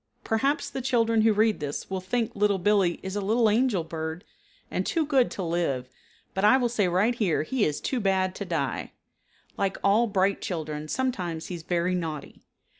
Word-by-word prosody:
Perhaps 275 +7 0
the 265 - -4
children 230 -3 +2
who 220 0 +5
read 215 +1 +2
this 145 -1 -4
will 190 -1 -3
think 225 +4 -2
Little 205 -1 +2
Billee 190 -2 +2
is 190 +1 -4
a 205 - -1
little 220 +3 +2
angel 215 -4 +2
bird 160 +1 -5 0.5
and - - 0
too 325 -2 0
good 270 -4 +3
to 190 - -5
live, 165 -7 -1 0.4
but 190 - -2
I 215 +5 +7
will 245 -2 +1
say 215 -5 +1
right 190 +7 +2
here 200 -10 +1
he 250 +6 0
is 150 - -1
too 260 - -2
bad 190 -3 +1
to - - -3
die. 160 -8 -2 0.6
Like 195 -1 0
all 215 +4 +4
bright 195 -1 +1
children 155 -3 -4
sometimes 180 -8 -2
he - - -4
is 170 - -7
very 175 +2 0
naughty. 160 -5 -4
195 Hz, 190 wpm, -27 LUFS, 170-225 Hz, 0.6 s, I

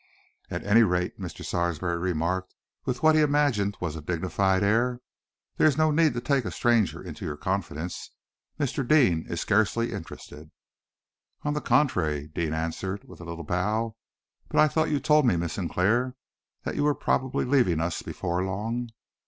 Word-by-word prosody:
"At - - -4
any 105 +3 +6
rate," 90 -4 +1
Mr. - - -7
Sarsby 85 -1 -1
remarked, 90 +1 -1 0.3
with 125 +2 -3
what 155 0 +6
he 155 - +4
imagined 145 -9 +2
was 85 -3 -3
a 80 - -6
dignified 95 +4 0
air, 120 +4 +2 0.6
"there - - +5
is 145 - +2
no 155 0 +3
need 155 -4 +3
to 120 - -2
take 135 +1 +1
a - - -3
stranger 115 -6 +1
into - - -8
your 75 -1 -4
confidence. 90 -2 -3 0.5
Mr. 140 -1 -1
Deane 120 - +4
is 85 - -2
scarcely 110 +3 +1
interested." 75 +1 -9 0.9
"On 145 - 0
the 150 - -2
contrary," 80 - +1
Deane 80 -1 -1
answered, 95 +5 -3
with - - -12
a - - -8
little 85 0 -6
bow. 105 +7 -1 0.5
"But - - +1
I 155 - +7
thought 160 +1 +1
you 145 - +1
told 150 0 +4
me, 105 - +4
Miss 85 0 -2
Sinclair, 110 +8 0 0.5
that - - -3
you - - 0
were 145 -1 +3
probably 130 +1 0
leaving 125 - +3
us 85 0 -2
before 90 +2 -2
long." 110 +6 -3
100 Hz, 170 wpm, -27 LUFS, 85-130 Hz, 0.9 s, I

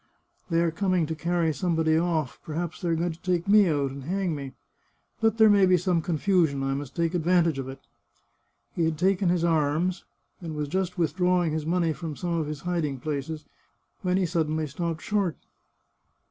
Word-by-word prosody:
" - - -40
They 165 0 +2
are 170 - +1
coming 185 -1 +1
to 160 - -3
carry 170 0 0
somebody 160 -2 +1
off; 160 -5 0
perhaps 165 +2 -4
they 175 - -1
are 165 - +2
going 170 +2 -1
to 160 - -12
take 180 0 -1
me 205 -1 +6
out 145 -4 0
and 135 -1 -8
hang 185 0 -1
me. 140 -3 -6 0.7
But 225 -1 +2
there 220 -1 +7
may 200 -2 +5
be 185 0 +5
some 175 -1 +1
confusion; 160 -4 +1
I 135 0 0
must 140 -1 -5
take 170 0 0
advantage 170 -3 +2
of 130 0 -4
it." 135 - -9 0.9
He 170 - +1
had 160 -1 -1
taken 185 +1 +2
his 175 -1 +1
arms, 165 +2 +1 0.4
and 165 -3 -6
was 150 -1 -3
just 185 +2 -2
withdrawing 180 0 +1
his 155 0 -3
money 170 -1 +1
from 160 -2 -6
some 175 +2 -3
of 155 - -2
his 150 -1 -5
hiding 165 -6 -2
places, 150 +2 -4 0.6
when 180 -1 +1
he 190 - +2
suddenly 160 -2 0
stopped 160 +2 -4
short. 200 -6 0
165 Hz, 195 wpm, -26 LUFS, 155-180 Hz, 0.9 s, there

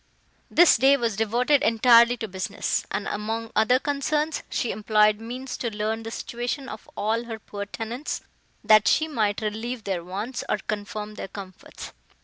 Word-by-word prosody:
This 345 0 +6
day 270 +4 +5
was 230 -5 -1
devoted 240 +7 +2
entirely 235 -1 +5
to 220 - -4
business; 190 +1 -2
and, 200 - -3
among 225 +2 -3
other 220 +4 +4
concerns, 295 +3 -1
she 240 - -1
employed 210 0 +3
means 255 +3 -6
to 235 - -2
learn 215 +1 -2
the 225 - -6
situation 245 +4 -4
of 215 - -9
all 225 +3 0
her 225 -1 -6
poor 205 -2 -7
tenants, 235 +7 -5 0.4
that 215 -1 +6
she 315 - +3
might 215 -9 0
relieve 220 +3 -3
their 190 -4 -2
wants, 205 +8 -4
or - - +2
confirm 210 0 -5
their 210 - -6
comforts. 190 -1 -10
225 Hz, 160 wpm, -25 LUFS, 210-245 Hz, 0.4 s, This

